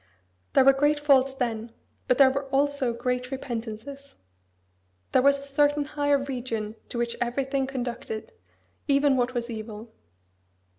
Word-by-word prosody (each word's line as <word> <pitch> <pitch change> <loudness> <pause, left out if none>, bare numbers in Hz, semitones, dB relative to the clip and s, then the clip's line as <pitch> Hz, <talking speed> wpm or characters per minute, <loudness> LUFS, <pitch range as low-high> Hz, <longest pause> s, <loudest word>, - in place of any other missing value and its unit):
There 265 - +5
were 275 - +8
great 290 +2 +2
faults 275 -2 +3
then; 230 -3 -3 0.3
but 250 - +3
there 270 -2 +7
were 275 +1 -2
also 275 -1 +1
great 250 +1 -2
repentances. 260 +2 -6 1.0
There - - +4
was 280 +1 +4
a - - -10
certain 290 +1 +2
higher 290 -1 +1
region 245 -6 -4
to - - -5
which 235 0 -1
everything 270 +2 -1
conducted 245 - -5 0.6
even 280 -1 +4
what 250 0 0
as 235 -1 -2
evil." 220 -1 -8
265 Hz, 140 wpm, -26 LUFS, 240-280 Hz, 1.0 s, were